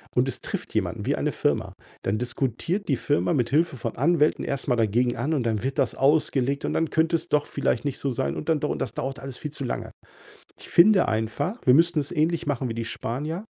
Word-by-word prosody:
und -, -, +3 dB
es -, -, -3 dB
trifft -, -, -5 dB
jemanden -, -, -1 dB
wie -, -, +2 dB
eine -, -, -1 dB
Firma, -, -, -1 dB, 0.3 s
dann 105 Hz, +2 st, 0 dB
diskutiert 135 Hz, -, -2 dB
die 135 Hz, -, +3 dB
Firma 145 Hz, +6 st, +1 dB
mithilfe 145 Hz, +4 st, +1 dB
von 115 Hz, -3 st, -5 dB
Anwälten 155 Hz, +2 st, +2 dB
erst 140 Hz, -1 st, -2 dB
mal 125 Hz, -, +3 dB
dagegen 120 Hz, +2 st, +1 dB
an 140 Hz, +7 st, -1 dB
und 140 Hz, -5 st, 0 dB
dann 110 Hz, -2 st, -1 dB
wird 135 Hz, +1 st, -2 dB
das -, -, +1 dB
ausgelegt 140 Hz, -1 st, +2 dB
und -, -, -1 dB
dann 165 Hz, -1 st, 0 dB
könnte 160 Hz, +2 st, +2 dB
es 165 Hz, +1 st, -3 dB
doch 150 Hz, -1 st, +2 dB
vielleicht 135 Hz, -2 st, -1 dB
nicht 140 Hz, -2 st, -2 dB
so 140 Hz, -, -2 dB
sein 70 Hz, -, -1 dB
und 155 Hz, -, -5 dB
dann 155 Hz, -2 st, +3 dB
doch 150 Hz, -, -1 dB
und -, -, -2 dB
das -, -, -2 dB
dauert 135 Hz, +1 st, -4 dB
alles 135 Hz, -2 st, -7 dB
viel 150 Hz, -, -5 dB
zu 140 Hz, -, -5 dB
lange. 120 Hz, -, -4 dB, 0.7 s
Ich -, -, -12 dB
finde 190 Hz, +2 st, +6 dB
einfach, 110 Hz, -, -1 dB
wir 125 Hz, -, +6 dB
müssten 165 Hz, +1 st, +4 dB
es 140 Hz, -, -3 dB
ähnlich 165 Hz, 0 st, 0 dB
machen 135 Hz, -3 st, -1 dB
wie 115 Hz, -, -3 dB
die 115 Hz, 0 st, -3 dB
Spanier 150 Hz, -, -4 dB
140 Hz, 235 wpm, -25 LUFS, 120-160 Hz, 0.7 s, finde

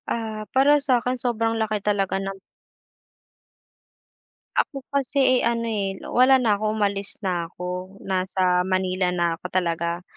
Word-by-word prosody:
Ah, 220 Hz, -2 st, -3 dB
para 285 Hz, +2 st, +5 dB
sakin 250 Hz, -2 st, +1 dB
sobrang 230 Hz, -2 st, 0 dB
laki 215 Hz, -1 st, 0 dB
talaga 195 Hz, -2 st, +1 dB
ng 195 Hz, 0 st, -4 dB, 2.2 s
Ako 275 Hz, -3 st, -2 dB
kasi, 275 Hz, -2 st, +2 dB
eh, -, -, -1 dB
ano, 235 Hz, 0 st, 0 dB
eh, 200 Hz, -3 st, -2 dB
wala 255 Hz, +2 st, +5 dB
na 225 Hz, -6 st, +2 dB
ako 215 Hz, 0 st, -1 dB
umalis 200 Hz, -2 st, -1 dB
na 175 Hz, -3 st, -1 dB
ako, 180 Hz, +2 st, -6 dB
nasa 185 Hz, -1 st, +1 dB
Manila 185 Hz, 0 st, 0 dB
na 175 Hz, -1 st, +1 dB
ako -, -, -26 dB
talaga. 170 Hz, -1 st, -1 dB
200 Hz, 135 wpm, -24 LUFS, 185-240 Hz, 2.2 s, para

